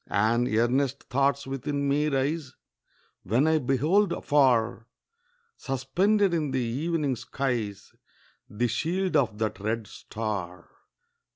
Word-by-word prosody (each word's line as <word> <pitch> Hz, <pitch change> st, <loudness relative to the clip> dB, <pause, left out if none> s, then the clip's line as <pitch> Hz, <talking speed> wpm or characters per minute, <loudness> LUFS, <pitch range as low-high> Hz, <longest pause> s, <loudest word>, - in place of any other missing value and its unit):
And 115 Hz, +4 st, +2 dB
earnest 130 Hz, +5 st, +1 dB
thoughts 140 Hz, +1 st, +1 dB
within 140 Hz, +2 st, -2 dB
me 145 Hz, +2 st, +2 dB
rise, 140 Hz, 0 st, -1 dB, 0.7 s
When 115 Hz, +9 st, +1 dB
I 160 Hz, 0 st, +3 dB
behold 155 Hz, +10 st, +2 dB
afar, 120 Hz, -5 st, +2 dB, 0.7 s
Suspended 175 Hz, -, +1 dB
in 155 Hz, -4 st, 0 dB
the 130 Hz, 0 st, -1 dB
evening 140 Hz, +4 st, -1 dB
skies 115 Hz, -6 st, -3 dB, 0.6 s
The 120 Hz, +4 st, 0 dB
shield 175 Hz, -, -1 dB
of 125 Hz, -8 st, +2 dB
that 110 Hz, -1 st, -2 dB
red 110 Hz, +2 st, -2 dB
star. 100 Hz, -6 st, -6 dB
135 Hz, 110 wpm, -27 LUFS, 115-150 Hz, 0.7 s, I